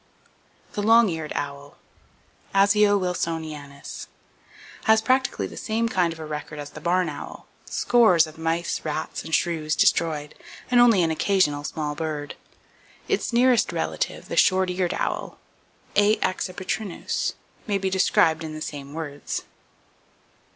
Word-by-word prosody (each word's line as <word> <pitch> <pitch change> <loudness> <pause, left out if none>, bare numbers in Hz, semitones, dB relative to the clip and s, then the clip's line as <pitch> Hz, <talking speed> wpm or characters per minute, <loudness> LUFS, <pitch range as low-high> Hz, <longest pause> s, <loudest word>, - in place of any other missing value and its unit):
The 205 - -2
Long 225 +1 +5
Eared 160 -3 -4
Owl, 140 0 -5 0.8
(Asio 205 +1 +5
wilsonianus) 160 -6 -4 0.8
has 220 -1 +6
practically 255 - +1
the - - -8
same 225 +1 -1
kind 180 -6 +1
of 165 - -8
a 160 - -7
record 150 0 -6
as 145 -1 -7
the 155 - -10
barn 180 +2 +1
owl,—scores 180 +4 +1
of 155 0 -13
mice, 165 +1 -1
rats 155 0 -4
and 160 - 0
shrews 155 -3 0
[Page - - +6
225] 155 -3 -3
destroyed, - - -16
and 245 -1 +6
only 225 -7 +6
an 165 - +1
occasional 160 -4 +1
small 150 0 -3
bird. 150 -1 -4 0.7
Its - - 0
nearest 245 0 +4
relative, - - -3
the - - -4
Short 185 -1 +4
eared 180 -1 -1
Owl - - -3 0.6
(A. 205 +1 +5
accipitrinus) 185 +1 -2 0.3
may 205 -2 +1
be 190 -1 -2
described 165 -3 +3
in 155 -1 -6
the - - -6
same 145 -1 -6
words. 145 -3 -5
165 Hz, 140 wpm, -24 LUFS, 155-200 Hz, 0.8 s, has